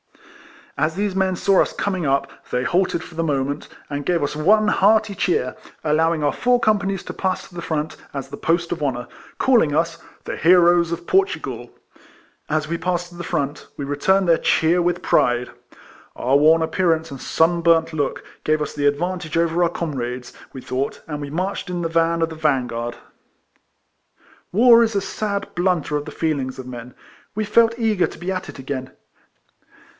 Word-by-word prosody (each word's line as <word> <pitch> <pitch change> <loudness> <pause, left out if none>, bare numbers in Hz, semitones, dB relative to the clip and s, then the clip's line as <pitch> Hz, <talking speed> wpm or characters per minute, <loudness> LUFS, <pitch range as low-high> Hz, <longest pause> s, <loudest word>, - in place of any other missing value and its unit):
As 160 - +1
these 200 0 -1
men 190 -1 +1
saw 195 +2 +3
us - - -1
com 200 -2 -1
ing 175 -4 -3
up 140 +1 +1 0.2
they 125 - -1
halted 175 +1 +1
for 180 - -12
the 165 +1 -2
moment, 140 -2 -1 0.2
and 145 0 -4
gave 170 +1 +1
us 145 - -2
one 210 +8 +4
hearty 210 +1 +3
cheer, 380 - 0 0.3
allowing 160 +1 +2
our 145 - +2
four 245 0 +2
companies 200 -4 +1
to - - -7
pass 190 -1 -2
to - - -21
the 175 - -6
front, 155 -2 -3
as 135 -1 -6
the 140 - -7
post 170 0 0
of 170 - -3
honour, 120 -4 -2 0.3
calling 225 - +3
us 165 +1 0
" - - -29
The - - -4
heroes 175 0 +5
of 170 0 -4
Portu 385 - +2
gal." - - -7 0.8
As 155 -1 0
we 170 +1 -3
passed 175 -1 -2
to 175 - -15
the 175 - -6
front, 145 -2 -3
we 140 - -4
re 145 +1 -2
turned 190 +4 +3
their 165 -1 +4
cheer 170 +2 +2
with 175 0 0
pride. 120 0 +2 0.6
Our 130 +3 +1
worn 160 +3 +5
appearance 165 -2 0
and 135 - -8
sun 170 +1 +2
burnt 165 -1 +3
look 145 -3 -2 0.2
gave 155 0 +2
us 150 - -3
the 145 -1 +1
advantage 165 +2 -1
over 170 +1 +1
our 170 - +4
comrades, 125 -7 -4 0.2
we 130 - -8
thought, 130 +3 -3
and 150 -2 -5
we 145 - -5
marched 185 +5 -3
in 175 -1 -3
the 165 - -1
van 165 0 +2
of 165 - 0
the 160 - -8
vansuard. 125 -6 -1 1.6
AYar 235 +3 +7
is 225 -2 -1
a 200 - +2
sad 200 0 -3
blunter 175 -4 0
of 145 0 -2
the 155 - -7
feelings 140 -6 -2
of 130 - -7
men. 125 -1 -9 0.4
We 215 0 -1
felt 230 +2 +3
eager 220 -6 +2
to - - -11
be 180 +2 -3
at 185 0 -4
it - - -9
again. 130 -1 -5
165 Hz, 195 wpm, -21 LUFS, 145-185 Hz, 1.6 s, AYar